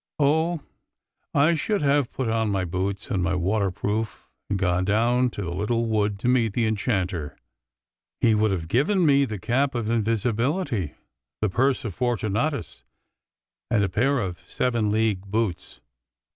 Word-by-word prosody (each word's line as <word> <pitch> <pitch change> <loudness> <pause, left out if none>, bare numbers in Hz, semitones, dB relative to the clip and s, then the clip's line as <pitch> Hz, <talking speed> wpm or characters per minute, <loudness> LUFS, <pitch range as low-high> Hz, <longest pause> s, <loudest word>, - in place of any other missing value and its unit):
Oh! 160 +3 +2 0.7
I 150 +4 +5
should 195 +4 0
have 140 -3 +2
put 130 -2 -3
on 110 -1 +1
my 95 -2 0
boots 95 +5 -3
and 95 -4 +1
my 90 +1 0
water 95 +3 +1
proof 105 +4 -3 0.2
and 100 - 0
gone 90 -1 +1
down 120 +5 +2
to 105 - -6
the 85 -1 -4
little 115 +5 0
wood 105 -2 0
to - - -1
meet 120 -4 +2
the 115 0 +1
enchanter! 95 - -1 0.8
He 115 - +4
would 110 0 +3
have 90 -5 -2
given 165 - +2
me 140 -2 +5
the 110 -5 -5
cap 130 +7 0
of 115 -2 -1
invisibility, 115 - 0 0.4
the 110 - +1
purse 130 +5 +1
of 100 -6 -4
Fortu 120 -4 -1
natus, 140 +8 -2 0.9
and 115 -4 +2
a 100 - 0
pair 130 +10 +2
of 90 -4 -4
seven 115 -4 0
league 105 -2 +1
boots. 105 -3 -2
110 Hz, 160 wpm, -25 LUFS, 100-125 Hz, 0.9 s, I